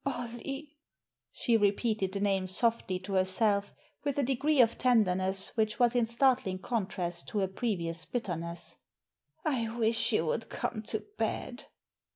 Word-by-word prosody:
Ollie!" 275 +3 -5 0.6
she 235 - +1
repeated 205 -1 +1
the 200 - -3
name 195 -2 +1
softly 205 -1 +1
to 195 +1 -6
herself, 200 +2 +2 0.3
with 285 -1 -1
a 285 - +2
degree 270 +3 +1
of 230 -2 +5
tenderness 190 -6 +3
which 215 -2 +1
was 245 -2 +4
in 240 -2 +2
startling 235 -5 +2
contrast 185 -5 -2
to - - -4
her 195 -2 +2
previous 185 -5 -2
bitterness. 170 -7 -4 0.3
" - - -42
I 250 -7 0
wish 225 +1 +2
you 210 -7 +2
would 225 +8 -2
come 215 - -3
to 220 - -3
bed." - - -2
220 Hz, 150 wpm, -31 LUFS, 190-245 Hz, 0.6 s, of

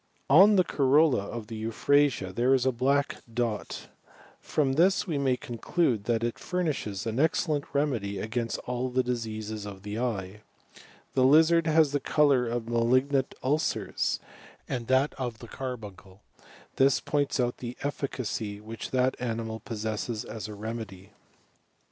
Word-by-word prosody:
On 195 +8 +8
the 185 - +5
coioUa 140 - +3
of 115 -2 -5
the 110 +1 -7
eu 110 +1 -3 0.6
there 125 +6 +3
is 130 -1 0
a 130 - +3
black 140 +4 +1
dot; 115 -2 -3 0.6
firom 135 -3 0
this 185 +5 +3
we 160 -7 -2
mav 130 -2 +1
coDclade 115 - 0
it 120 0 -2
furnishes 155 - -2
an 115 +2 -2
excellent 155 -1 +1
remedy 120 -9 -1
against 115 +3 -2
all 125 +1 -2
the 110 -4 -3
eye. 105 -4 -3 0.7
The 130 - +3
lizard 160 +4 +5
has 155 -2 +4
the 145 - +1
colour 140 -5 +3
of 115 -1 -3
malignant 130 +4 +1
«lcei% 150 +4 0 0.5
and 120 0 -3
of 130 -3 +1
the 120 - -11
carbuncle; 105 -7 -8 0.6
this 135 0 +4
points 145 -2 -1
out 120 -1 0
the 120 0 -7
eflicacy 120 -7 -3
which 110 +2 -7
that 130 0 +1
animal 115 -2 -3
possesses 110 0 -4
as 110 -2 -6
a 105 - -8
remedy. 105 -3 -7
125 Hz, 135 wpm, -28 LUFS, 110-140 Hz, 0.7 s, On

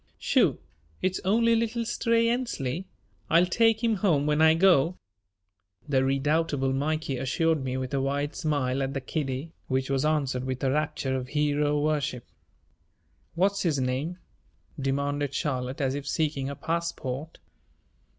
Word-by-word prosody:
"Shoo, - - +2 0.5
it's 185 0 +1
only 230 +4 +3
little 230 +1 -1
Stray 230 0 +2
Ensley. 195 - -2 0.4
I'll 170 +2 +5
take 225 +4 +2
him 225 -2 +2
home 165 -8 +2
when 150 +1 +2
I 160 0 +6
go," 175 -1 +4 0.9
the 135 -2 +2
redoubtable 135 0 +1
Mikey 145 0 -1
assured 155 +3 +1
me 130 0 -2
with 130 +1 -4
a 135 - +1
wide 145 +2 -1
smile 140 -5 0
at 135 +1 -2
the - - 0
kiddie, 135 +2 -3 0.2
which 130 0 -1
was 135 0 +1
answered 140 -5 0
with 130 0 -4
a 135 - +2
rapture 145 -2 -1
of 125 -1 -3
hero 150 0 +1
worship. 145 -5 -1 1.1
"What's 195 +3 +2
his 160 -5 +1
name?" 135 +7 -2 0.6
demanded 140 +1 -1
Charlotte 130 -1 -2
as 135 -1 +1
if 140 0 -5
seeking 145 -3 -1
a 140 - -5
passport. 160 -3 -3
145 Hz, 145 wpm, -27 LUFS, 135-165 Hz, 1.1 s, I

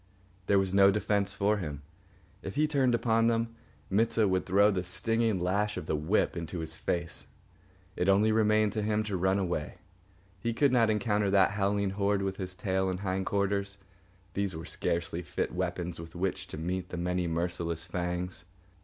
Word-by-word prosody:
There 100 - +4
was 95 -1 +1
no 100 0 +7
defence 100 0 0
for 105 +1 +2
him. 75 -6 -5 0.6
If 95 - -6
he 150 - +3
turned 135 -5 +2
upon 115 -1 +2
them, 115 0 0 0.3
Mit 110 +4 +2
sah 110 - +3
would 95 -2 0
throw 100 +3 +5
the 90 -2 -1
stinging 115 +3 +1
lash 100 +4 0
of - - -5
the 80 - -1
whip 80 +9 +1
into 85 0 -5
his 80 -1 -4
face. 85 0 -3 0.7
Only 100 +4 +3
remained 110 -1 +3
to 110 - -1
him 105 0 +1
to 105 -2 -3
run 95 +2 +2
away. 90 -6 -2 0.6
He 115 -1 -2
could 140 +1 +3
not 115 -3 +4
encounter 105 -2 +1
that 95 -1 +4
howling 100 -1 0
horde 100 0 0
with 95 0 -2
his 95 -1 -5
tail 95 0 0
and 90 0 -3
hind 95 -1 -2
quarters. 100 0 -1 0.5
These 100 -3 -1
were 80 0 -6
scarcely 85 0 -2
fit 85 - -3
weapons 90 -1 -3
with 85 0 -10
which 95 +2 -2
to - - -7
meet 90 +3 -3
the 90 - -5
many 90 0 -1
merciless 85 0 -2
fangs. 90 0 -4
95 Hz, 180 wpm, -30 LUFS, 90-105 Hz, 0.7 s, no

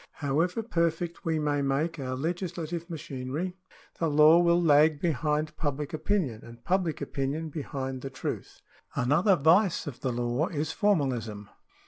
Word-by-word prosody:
However 165 +9 0
perfect 170 -3 -1
we 160 -1 +1
may 145 -1 0
make 145 +4 0
our 130 -1 -3
legislative 170 +2 -3
machinery, 155 +2 -4 0.4
the 165 - +1
law 150 +3 +7
will 170 0 +4
lag 155 -2 +5
behind 150 -1 0
public 145 0 -3
opinion, 155 - -1
and 115 0 -13
public 180 -3 0
opinion 145 +4 -2
behind 135 -3 -4
the 135 - -5
truth. 130 0 -6 0.3
Another 160 - +3
vice 175 +5 +3
of 135 -5 -7
the 130 -1 -1
law 120 +6 0
is 155 -1 -2
formalism. 125 - 0
155 Hz, 140 wpm, -28 LUFS, 135-170 Hz, 0.4 s, law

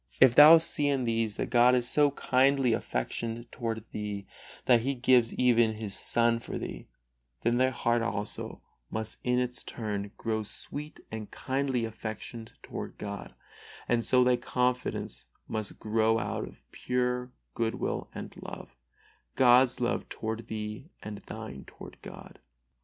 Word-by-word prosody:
If 130 -2 +7
thou 150 +5 +10
see 150 -2 +4
in 135 -2 +1
these 115 -3 0
that - - -3
God 120 +1 +6
is 120 -1 +2
so 145 +2 +4
kindly 135 -2 +2
affectioned 115 - -3
toward 115 -2 -4
thee 105 -2 -4 0.4
that 120 -2 +5
He 135 +3 -1
gives 125 -2 +4
even 120 -3 +3
His 105 -2 -3
Son 115 +2 +3
for - - -6
thee, - - -7 0.5
then 120 +1 +1
thy 130 0 +4
heart 120 -2 0
also 105 -2 -4 0.3
must 110 0 -4
in 125 0 +1
its 125 0 -1
turn 105 -3 -4
grow 110 -1 -1
sweet 145 +8 -3
and 110 -1 -6
kindly 130 -3 -1
affectioned 110 +1 -7
toward - - -7
God, - - -7 0.5
and 120 -1 +1
so 125 +2 +4
thy 125 0 +3
confidence 125 - -2 0.2
must 110 -2 -3
grow 110 +1 +2
out - - -3
of - - -15
pure 125 0 -1 0.2
good 115 -1 -1
will - - -3
and - - -7
love - - -9 0.6
God's 125 0 +5
love 120 -1 -1
toward 110 +1 -5
thee 110 +6 -6
and 105 -1 -6
thine 65 0 -7
toward - - -12
God. - - -11
120 Hz, 150 wpm, -29 LUFS, 110-125 Hz, 0.6 s, thou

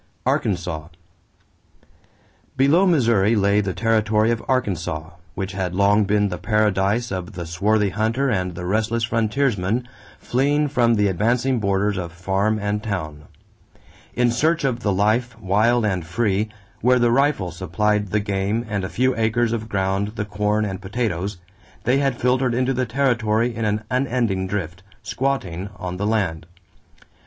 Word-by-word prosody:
=Arkansas.= 85 -5 -1 1.7
Below 150 +9 +4
Missouri 115 - +3
lay 100 0 +3
the 95 -3 -3
territory 110 -1 +2
of 115 - -2
Arkansas, 85 -10 -1 0.2
which 95 +1 -3
had 95 -2 -3
long 100 +2 +4
been 105 0 +2
the - - -5
paradise 105 +1 +1
of 95 +2 -4
the 85 -2 -5
swarthy 100 +5 +1
hunter 110 +8 0
and 90 -7 -1
the 90 +1 -6
restless 110 +4 0
frontiersman 115 -1 0 0.3
fleeing 145 +4 +1
from 120 -4 +3
the 105 -1 +2
advancing 120 +7 +1
borders 100 0 0
of 85 -2 -4
farm 95 +5 0
and 105 0 -2
town. 80 -9 -5 0.9
In 120 -1 +3
search 160 +7 +1
of 130 -3 0
the 105 -4 0
life, 110 +4 +1
wild 110 +4 +2
and 95 -4 -1
free, 100 +4 0 0.3
where 125 +1 +4
the 120 -1 +3
rifle 135 -8 +1
supplied 105 +5 0
the 105 +3 0
game 100 +3 -1
and 100 -3 -2
a 95 - -3
few 130 +1 +1
acres 115 +1 +1
of 110 -1 -4
ground 95 +2 -1
the 105 - -2
corn 105 +1 0
and 95 -1 -5
potatoes, 100 -2 -2 0.5
they 130 +2 +2
had 135 -3 0
filtered 125 0 +1
into 130 +2 +1
the 130 0 -1
territory 120 -2 +1
in 115 0 -2
an 105 +1 0
unending 120 -7 0
drift, 95 -3 -4 0.2
"squatting" 100 -9 -2
on 90 0 -5
the 100 +2 -1
land. 90 -8 -1
105 Hz, 150 wpm, -22 LUFS, 95-120 Hz, 1.7 s, Below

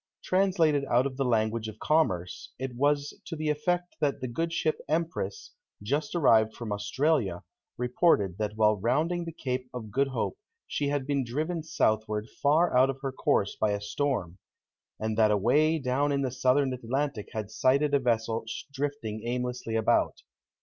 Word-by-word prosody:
Translated 180 -6 +2
out 125 -1 +3
of 135 -1 -3
the 135 - 0
language 110 -2 0
of 110 -1 -8
commerce, 95 - 0
it 130 -1 -4
was 145 +2 +1
to 165 - -5
the 155 0 -2
effect 175 +4 -1
that 140 -2 0
the 130 - -3
good 165 +8 -2
ship 160 -1 0
Empress, 160 - -2 0.3
just 145 +9 -1
arrived 110 -9 +4
from 115 -3 -6
Australia, 105 - 0 0.3
reported 125 - +2
that 105 0 -2
while 110 -1 +3
rounding 155 - 0
the 165 - -5
Cape 130 -4 -4
of 110 -4 -6
Good 135 +5 +2
Hope 135 - -3 0.3
she 145 - -2
had 140 -2 -1
been 140 -1 0
driven 155 +8 -2
southward 110 -8 0
far 155 +2 +3
out 130 +2 +5
of 135 0 -3
her 135 - -1
course 100 -5 +1
by 105 -1 +1
a 100 - -1
storm; 105 -4 -2 0.6
and 110 0 -2
that 110 -1 +5
away 135 +10 +3
down 140 +1 0
in 140 -1 +1
the 130 - -1
Southern 130 +1 +2
Atlantic 125 -1 -2
had 110 -1 -4
sighted 140 +5 +2
a 140 - +5
vessel 115 -2 0 0.3
drifting 140 -6 -3
aimlessly 125 -2 -2
about. 110 -1 +1
130 Hz, 170 wpm, -28 LUFS, 110-145 Hz, 0.6 s, out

